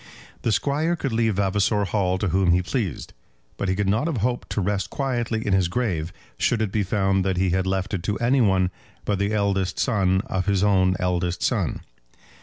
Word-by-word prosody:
The 115 Hz, -, 0 dB
Squire 150 Hz, +9 st, +1 dB
could 135 Hz, -7 st, -3 dB
leave 110 Hz, -2 st, +1 dB
Vavasor 100 Hz, +1 st, +1 dB
Hall 95 Hz, -1 st, 0 dB
to 100 Hz, 0 st, -1 dB
whom 90 Hz, 0 st, +3 dB
he 90 Hz, +1 st, +2 dB
pleased, 100 Hz, -, -3 dB, 0.4 s
but 100 Hz, -, -2 dB
he 95 Hz, -, +1 dB
could 100 Hz, 0 st, -1 dB
not 110 Hz, +10 st, +1 dB
have 160 Hz, -6 st, -1 dB
hoped 125 Hz, -1 st, -2 dB
to -, -, -2 dB
rest 100 Hz, 0 st, -1 dB
quietly 120 Hz, -5 st, -2 dB
in 100 Hz, -, +1 dB
his 95 Hz, -2 st, +3 dB
grave 90 Hz, -6 st, -2 dB, 0.3 s
should 120 Hz, -, +2 dB
it 110 Hz, -3 st, -1 dB
be 105 Hz, -, 0 dB
found 95 Hz, -1 st, +1 dB
that 95 Hz, -1 st, -1 dB
he 95 Hz, 0 st, +1 dB
had 95 Hz, +1 st, 0 dB
left 95 Hz, +2 st, -1 dB
it 95 Hz, -, -1 dB
to 105 Hz, +3 st, -2 dB
any 125 Hz, +3 st, +2 dB
one 95 Hz, -4 st, +2 dB, 0.3 s
but 100 Hz, -2 st, 0 dB
the 100 Hz, +1 st, 0 dB
eldest 100 Hz, -3 st, 0 dB
son 95 Hz, -4 st, +1 dB
of 95 Hz, 0 st, -2 dB
his 100 Hz, -1 st, +2 dB
own 95 Hz, -2 st, +3 dB
eldest 90 Hz, -1 st, -1 dB
son. -, -, 0 dB
100 Hz, 210 wpm, -24 LUFS, 95-110 Hz, 0.4 s, whom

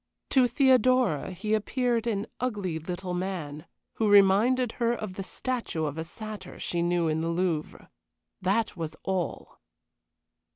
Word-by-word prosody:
To 260 Hz, -2 st, +5 dB
Theodora 255 Hz, -, +3 dB
he 200 Hz, +4 st, -3 dB
appeared 235 Hz, +1 st, 0 dB
an 210 Hz, -2 st, 0 dB
ugly 205 Hz, -9 st, -2 dB
little 180 Hz, +2 st, -4 dB
man, 175 Hz, -4 st, -4 dB, 0.3 s
who 220 Hz, -2 st, +2 dB
reminded 210 Hz, +5 st, +5 dB
her 235 Hz, 0 st, 0 dB
of 215 Hz, -4 st, -5 dB
the 195 Hz, -, -5 dB
statue 210 Hz, -6 st, -3 dB
of 150 Hz, +1 st, -4 dB
a -, -, -2 dB
satyr 210 Hz, +2 st, -8 dB
she 175 Hz, -, -1 dB
knew 175 Hz, -1 st, +1 dB
in 155 Hz, 0 st, 0 dB
the 165 Hz, -, -1 dB
Louvre. 170 Hz, -2 st, -2 dB, 0.5 s
That 200 Hz, +5 st, +1 dB
was 160 Hz, -2 st, -5 dB
all! 190 Hz, -2 st, -3 dB
195 Hz, 140 wpm, -28 LUFS, 170-230 Hz, 0.5 s, To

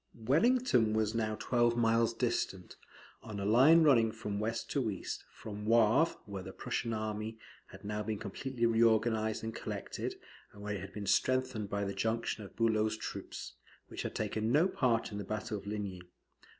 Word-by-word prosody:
Wellington 135 Hz, -, +3 dB
was 110 Hz, 0 st, +1 dB
now 115 Hz, -1 st, 0 dB
about -, -, -7 dB
twelve 120 Hz, -1 st, +2 dB
miles 115 Hz, 0 st, +3 dB
distant, 105 Hz, -6 st, -2 dB, 0.5 s
on 105 Hz, -3 st, -7 dB
a 100 Hz, -, -2 dB
line 135 Hz, +10 st, +6 dB
running 115 Hz, -7 st, +5 dB
from 105 Hz, -2 st, -4 dB
west 110 Hz, +2 st, -2 dB
to 130 Hz, -6 st, 0 dB
east, 100 Hz, -, -5 dB
from 105 Hz, 0 st, -8 dB
Wavre, 115 Hz, +7 st, +4 dB
where 100 Hz, -2 st, -6 dB
the 95 Hz, +1 st, -8 dB
Prussian 115 Hz, +4 st, -3 dB
army 110 Hz, 0 st, -3 dB, 0.3 s
had -, -, -13 dB
now 105 Hz, +1 st, -2 dB
been 105 Hz, 0 st, -2 dB
completely 120 Hz, +5 st, -3 dB
reorganised 110 Hz, -1 st, +2 dB
and 110 Hz, 0 st, -3 dB
collected, -, -, -5 dB, 0.4 s
and 100 Hz, -, -11 dB
where 105 Hz, 0 st, -2 dB
it 100 Hz, -, -4 dB
had 100 Hz, +1 st, -8 dB
been 105 Hz, -1 st, -6 dB
strengthened 130 Hz, -1 st, +1 dB
by 100 Hz, 0 st, -1 dB
the 100 Hz, 0 st, -2 dB
junction 115 Hz, 0 st, -1 dB
of 100 Hz, -, -12 dB
Bulow's 110 Hz, -1 st, +1 dB
troops, -, -, -6 dB, 0.4 s
which -, -, -5 dB
had -, -, -5 dB
taken 110 Hz, +1 st, -1 dB
no 155 Hz, +7 st, +5 dB
part 120 Hz, -11 st, +1 dB
in 100 Hz, -, -4 dB
the -, -, -3 dB
battle 105 Hz, +2 st, -4 dB
of 100 Hz, 0 st, -7 dB
Ligny. 100 Hz, -3 st, -4 dB
110 Hz, 180 wpm, -33 LUFS, 105-115 Hz, 0.5 s, line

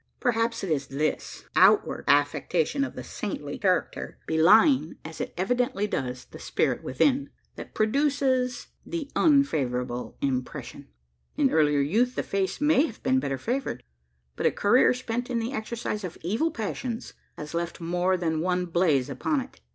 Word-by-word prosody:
Perhaps 230 Hz, -1 st, 0 dB
it 190 Hz, -, -2 dB
is 140 Hz, -3 st, 0 dB
this 150 Hz, +3 st, -3 dB
outward -, -, +4 dB
affectation 150 Hz, -, +2 dB
of 280 Hz, -, -5 dB
the -, -, -6 dB
saintly 150 Hz, -8 st, -5 dB
character 185 Hz, -3 st, -1 dB
belying, 185 Hz, -, +4 dB
as 160 Hz, 0 st, -7 dB
it -, -, -4 dB
evidently 245 Hz, +2 st, 0 dB
does, 130 Hz, -10 st, -3 dB
the -, -, -13 dB
spirit -, -, 0 dB
within, 270 Hz, -, +1 dB, 0.3 s
that -, -, -10 dB
produces 260 Hz, +1 st, +1 dB
the 315 Hz, -4 st, -5 dB
unfavourable 130 Hz, -, +1 dB
impression. 130 Hz, -2 st, -4 dB, 0.5 s
In 280 Hz, -3 st, +3 dB
earlier 150 Hz, -2 st, +3 dB
youth, 230 Hz, -, +1 dB
the -, -, -1 dB
face 195 Hz, +3 st, -2 dB
may 295 Hz, +1 st, +4 dB
have -, -, -12 dB
been 260 Hz, 0 st, +3 dB
better 135 Hz, -, -2 dB
favoured; 235 Hz, -, -3 dB, 0.5 s
but -, -, +1 dB
a -, -, +3 dB
career, 245 Hz, +5 st, +4 dB
spent 245 Hz, -1 st, -4 dB
in 245 Hz, -, -1 dB
the 230 Hz, +3 st, -2 dB
exercise 220 Hz, -2 st, -4 dB
of 180 Hz, -, -6 dB
evil 220 Hz, -, 0 dB
passions, 230 Hz, -1 st, -4 dB, 0.2 s
has 150 Hz, +1 st, -7 dB
left 170 Hz, 0 st, -3 dB
more 180 Hz, +2 st, 0 dB
than 160 Hz, -3 st, -1 dB
one 180 Hz, +1 st, 0 dB
"blaze" 165 Hz, -7 st, +2 dB
upon 150 Hz, -, -1 dB
it. 260 Hz, -, -12 dB
200 Hz, 155 wpm, -26 LUFS, 155-250 Hz, 0.5 s, outward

